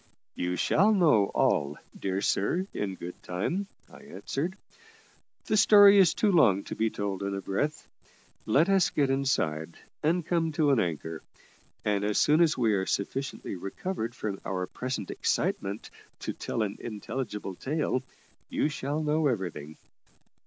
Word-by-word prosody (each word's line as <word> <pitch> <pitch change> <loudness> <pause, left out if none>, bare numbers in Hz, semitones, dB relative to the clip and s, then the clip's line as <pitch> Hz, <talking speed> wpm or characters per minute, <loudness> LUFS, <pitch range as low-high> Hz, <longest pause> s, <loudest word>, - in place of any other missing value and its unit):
"You 90 0 -2
shall 200 - +3
know 150 - +4
all, 75 -5 +1 0.2
dear 95 0 -2
sir, 170 - +1
in 95 -2 -3
good 90 0 -9
time," 165 - -2 0.2
I - - -15
answered. 185 -4 -4 0.9
"The - - +1
story 205 -1 +8
is 180 -4 +5
too 210 - +2
long 110 - +4
to - - -6
be 110 0 +1
told 100 -2 -4
in 100 0 -2
a - - -3
breath. 145 +12 -2 0.6
Let 145 +10 +4
us 195 -3 +3
get 140 -2 +1
inside, 85 - -1 0.2
and 165 +2 +1
come 165 -2 0
to 145 -1 +3
an 135 - +3
anchor; 80 -3 -3 0.6
and 105 -1 +1
as 105 0 0
soon 155 +3 +4
as 165 -3 +3
we 115 -4 +2
are 95 -1 0
sufficiently 135 +3 -3
recovered 115 - -4
from 100 -5 -4
our 90 -1 -2
present 125 -1 -4
excitement 100 +2 -2 0.3
to - - -3
tell 115 - -2
an 100 -1 -4
intelligible 105 -2 -5
tale, 135 - -1 0.5
you - - 0
shall 145 +1 -3
know 150 0 +2
everything." 85 - -3
120 Hz, 150 wpm, -28 LUFS, 95-155 Hz, 0.9 s, story